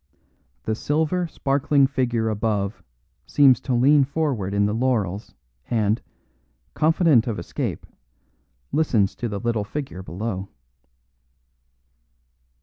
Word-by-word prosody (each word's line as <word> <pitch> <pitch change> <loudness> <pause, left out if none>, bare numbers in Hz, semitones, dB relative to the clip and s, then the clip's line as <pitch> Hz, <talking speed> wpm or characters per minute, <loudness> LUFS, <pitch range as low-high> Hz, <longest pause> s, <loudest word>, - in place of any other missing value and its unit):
The 110 - -1
silver, 160 +8 0
sparkling 140 -1 +2
figure 120 -4 0
above 105 -1 -1 0.5
seems 135 -5 +5
to 130 - -1
lean 140 +4 +5
forward 135 -9 -1
in 100 0 +2
the 105 - 0
laurels 110 -5 -1 0.3
and, 110 -1 +1 0.7
confident 155 -6 +3
of 115 - -2
escape, 85 - -4 0.9
listens 120 -11 +2
to 120 - -3
the 100 -1 -4
little 115 -2 -1
figure 135 -3 -6
below. 95 +3 -5
120 Hz, 105 wpm, -23 LUFS, 105-140 Hz, 0.9 s, seems